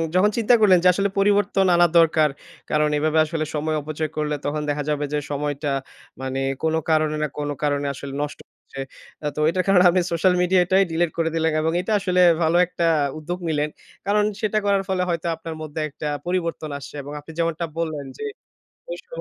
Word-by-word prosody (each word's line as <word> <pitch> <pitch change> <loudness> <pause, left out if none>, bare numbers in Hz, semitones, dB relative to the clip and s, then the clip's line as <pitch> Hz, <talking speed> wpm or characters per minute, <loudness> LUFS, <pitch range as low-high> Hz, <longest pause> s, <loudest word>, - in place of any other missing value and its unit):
যখন 200 +3 +5
চিন্তা 230 +1 +3
করলেন 190 -4 +6
যে, - - +5
আসলে 200 +2 0
পরিবর্তন 200 -1 +3
আনা 175 0 +5
দরকার, 155 -2 +4 0.4
কারণ 150 0 +2
এভাবে 155 +1 +1
আসলে 155 0 -2
সময় 155 +1 -1
অপচয় 155 +1 -3
করলে 150 -1 0
তখন 150 +1 -1
দেখা 145 0 -1
যাবে 145 0 0
যে, 150 - +1
সময়টা 145 0 -2 0.5
মানে 130 0 -3 0.2
কোন 160 0 +1 0.2
কারণে 155 -1 +2
না, - - +1
কোন 145 0 -2
কারণে 145 -1 0
আসলে 140 0 -8
নষ্ট 145 - -4
হচ্ছে। 135 - -13 0.5
আ - - +2
তো - - -4
এটার 185 +1 0
কারণে 190 -2 +5
আপনি 180 +1 +2
সোশ্যাল 175 +2 +3
মিডিয়াটাই 185 +1 +4
ডিলিট 170 0 +1
করে 165 -1 +1
দিলেন। 160 0 +1
এবং 160 +1 +1
এটা 200 - -4
আসলে 180 -2 +1 0.2
ভালো 160 +2 +2
একটা 170 -1 -2 0.3
উদ্যোগ 175 +4 -5
নিলেন। 150 -1 0 0.4
কারণ 210 +1 +2 0.2
সেটা 215 0 0
করার 200 -1 +2
ফলে 185 -1 0
হয়তো 170 0 -1
আপনার 160 0 -7
মধ্যে 155 0 -6
একটা 150 +2 -6 0.2
পরিবর্তন 170 -3 -2
আসছে 140 - -10
এবং 145 +2 -9
আপনি 150 +2 -12
যেমনটা 165 0 0
বললেন 155 -4 -3
যে - - -6 0.7
ঐ - - -1
শো - - -11
160 Hz, 195 wpm, -23 LUFS, 150-180 Hz, 0.7 s, করলেন